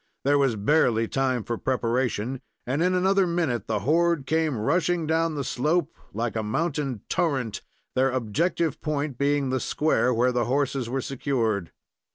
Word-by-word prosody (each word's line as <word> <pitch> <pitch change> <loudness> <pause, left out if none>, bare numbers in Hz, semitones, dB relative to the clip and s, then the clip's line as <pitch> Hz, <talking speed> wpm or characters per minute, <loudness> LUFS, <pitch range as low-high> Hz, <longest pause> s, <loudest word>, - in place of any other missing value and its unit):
There 145 +1 +3
was 135 -5 +2
barely 115 0 +2
time 130 -3 0
for 115 +1 -4
preparation, 125 0 -1 0.2
and 135 +5 -1
in 180 +1 +2
another 190 +1 +3
minute 160 - -1
the 105 -2 -1
horde 165 - +2
came 160 -3 +1
rushing 165 +8 +1
down 160 0 +1
the 140 - -2
slope, 155 +6 0 0.2
like 115 +2 -3
a 110 - 0
mountain 135 - -2
torrent, 135 -10 -1 0.3
their 130 +1 +3
objective 140 - -1
point 145 -4 -2
being 140 -1 +1
the 130 - +1
square 145 0 +1
where 125 +1 +2
the 120 -1 0
horses 135 -1 0
were 135 +2 -1
secured. 115 - -1
135 Hz, 160 wpm, -25 LUFS, 120-160 Hz, 0.3 s, There